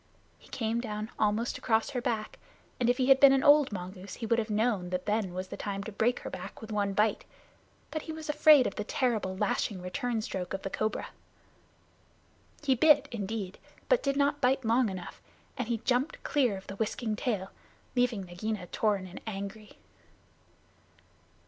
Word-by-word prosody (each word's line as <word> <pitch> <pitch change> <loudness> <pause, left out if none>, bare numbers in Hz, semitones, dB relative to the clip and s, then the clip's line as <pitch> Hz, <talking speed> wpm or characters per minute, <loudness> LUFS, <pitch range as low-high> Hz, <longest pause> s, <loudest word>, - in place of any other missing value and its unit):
He - - -19
came 230 0 -1
down 215 -2 -5
almost 215 +3 +1
across 225 +2 +1
her 250 -3 -2
back, 225 -4 -3 0.4
and 240 -1 +2
if 245 - +3
he 260 0 +1
had 270 0 +7
been 275 -1 +8
an 270 0 +2
old 290 -2 +6
mongoose 185 0 -7
he 230 - -5
would 230 +1 +2
have 220 0 -2
known 210 -4 +1
that 180 0 -3
then 210 -3 0
was 185 +1 -5
the - - -6
time 200 -1 -4
to 220 - -6
break 230 +4 +1
her - - -5
back - - -7
with 220 0 -9
one 200 -2 0
bite; 210 +2 +2 0.7
but 310 - -3
he 320 - -7
was 315 -1 -7
afraid 300 -2 +6
of - - -1
the 210 - -3
terrible 215 -5 -1
lashing 200 -1 0
return 235 +6 -2
stroke 185 -3 -4
of 190 - -7
the 195 - -4
cobra. 215 0 -2 1.5
He 275 -3 +4
bit, 290 +2 +5
indeed, 205 -3 -4 0.3
but - - +4
did 275 -1 0
not 285 +1 +2
bite 260 0 +2
long 230 +1 +3
enough, 185 -2 -7 0.3
and 250 - -3
he 235 -1 0
jumped 250 +5 -1
clear 250 -9 +1
of 190 - -11
the 195 - -8
whisking 220 0 -1
tail, 210 -6 -2 0.4
leaving 245 -5 +1
Nagaina 185 +2 -4
torn 205 -3 +1
and 185 0 -10
angry. 205 +1 -6
220 Hz, 185 wpm, -30 LUFS, 200-255 Hz, 1.5 s, been